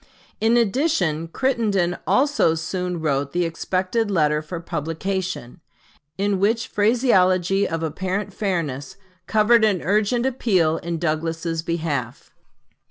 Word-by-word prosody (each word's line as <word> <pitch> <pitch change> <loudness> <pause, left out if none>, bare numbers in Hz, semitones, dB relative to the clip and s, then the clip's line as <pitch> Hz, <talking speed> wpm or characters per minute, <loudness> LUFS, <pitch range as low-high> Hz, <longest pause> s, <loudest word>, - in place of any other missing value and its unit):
In 225 +2 +3
addition 195 - +1
Crittenden 205 -5 0
also 270 - +3
soon 180 +1 -3
wrote 140 -2 -1
the 175 0 +1
expected 185 +6 -1
letter 150 -5 +2
for 160 +3 -6
publication, 170 -1 -4 0.6
in 200 0 0
which 225 +4 +1
phraseology 195 -4 +2
of 165 0 -3
apparent 185 +6 -3
fairness 165 -10 -3 0.3
covered 220 +2 +4
an 205 -5 +2
urgent 215 +5 +1
appeal 190 -11 +1
in 170 0 -4
Douglas's 165 0 -2
behalf. 155 -8 -3
185 Hz, 110 wpm, -22 LUFS, 165-210 Hz, 0.6 s, covered